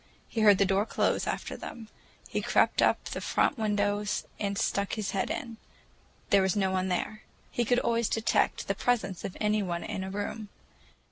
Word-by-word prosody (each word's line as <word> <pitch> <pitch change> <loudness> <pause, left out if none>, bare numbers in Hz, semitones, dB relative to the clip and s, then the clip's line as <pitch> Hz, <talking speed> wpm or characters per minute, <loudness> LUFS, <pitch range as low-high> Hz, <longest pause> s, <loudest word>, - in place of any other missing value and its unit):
He 225 - -2
heard 205 -2 +7
the 200 - +4
door 195 +3 +1
close - - +1
after - - -3
them. 225 -2 -8 0.4
He - - -2
crept - - +3
up - - +3
to - - -6
the - - -4
front 280 - +1
windows 205 -1 0
and 200 -1 -1
stuck 200 0 0
his 215 -3 -2
head 195 - -1
in: 230 -2 -4 0.7
there 200 - +6
was 190 -1 +1
no 190 -2 +1
one 185 0 0
there. 200 +4 -2 0.3
He 240 - 0
could 245 +2 +3
always 235 -2 +1
detect 225 -1 +1
the - - +1
presence 215 -7 -1
of 185 - -5
any 210 0 +2
one 175 -3 -2
in 190 - -4
a 190 - -5
room. 205 +2 -4
205 Hz, 195 wpm, -29 LUFS, 195-220 Hz, 0.7 s, heard